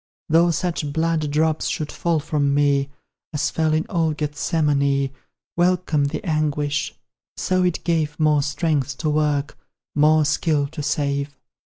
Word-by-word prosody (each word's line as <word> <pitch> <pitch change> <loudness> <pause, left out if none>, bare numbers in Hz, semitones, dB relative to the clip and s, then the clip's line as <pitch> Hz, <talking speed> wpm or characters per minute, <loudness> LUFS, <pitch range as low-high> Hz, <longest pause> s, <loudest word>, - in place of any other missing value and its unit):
Though 165 +2 +5
such 165 -3 -1
blood 160 -1 0
drops 155 +1 +1
should 150 -1 -3
fall 170 -2 0
from 145 -2 0
me 140 -1 +2 0.4
As 150 - 0
fell 160 -1 +1
in 155 +1 +1
old 160 -4 0
Gethsemane, 145 -2 0 0.4
Welcome 175 -4 +2
the 155 +5 -3
anguish, 150 -2 -1 0.4
so 185 0 +1
it 180 -2 0
gave 160 -3 0
More 150 -2 +3
strength 145 -2 -1
to 155 -2 -1
work 150 -1 0 0.4
more 155 +1 +4
skill 150 -1 +1
to 150 0 -6
save. 140 -1 -1
150 Hz, 140 wpm, -22 LUFS, 145-160 Hz, 0.4 s, Though